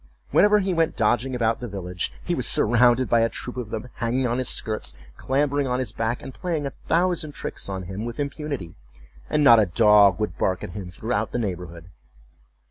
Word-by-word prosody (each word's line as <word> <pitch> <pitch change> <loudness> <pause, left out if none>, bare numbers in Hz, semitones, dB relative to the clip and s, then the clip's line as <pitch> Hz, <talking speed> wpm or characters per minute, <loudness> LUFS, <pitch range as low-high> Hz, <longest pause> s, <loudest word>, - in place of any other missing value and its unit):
Whenever 210 0 +5
he 195 -2 0
went 165 -2 +1
dodging 120 +3 +1
about 115 -2 0
the 120 - -5
village, 90 -4 -4
he - - -1
was - - 0
surrounded 120 +2 +4
by 115 - +3
a 115 - +2
troop 125 - -7
of 125 -4 -5
them, 110 +3 -5
hanging 125 +3 0
on 120 +1 0
his 130 - -1
skirts, 105 - -2 0.2
clambering 140 +1 0
on 125 0 0
his 125 -5 -3
back, 115 +2 -2
and 135 - -8
playing 165 -4 -3
a 140 - -4
thousand 170 -3 +1
tricks - - -6
on 95 -1 -4
him 95 +4 -6
with 120 +2 -6
impunity; 140 - -4 0.6
and 150 - +2
not 115 -5 +8
a 105 - +3
dog 105 +1 +5
would 105 -6 -3
bark 95 -1 0
at - - -6
him 95 -1 -7
throughout 105 +2 -2
the - - 0
neighborhood. 90 -5 -5
120 Hz, 205 wpm, -24 LUFS, 100-135 Hz, 0.6 s, not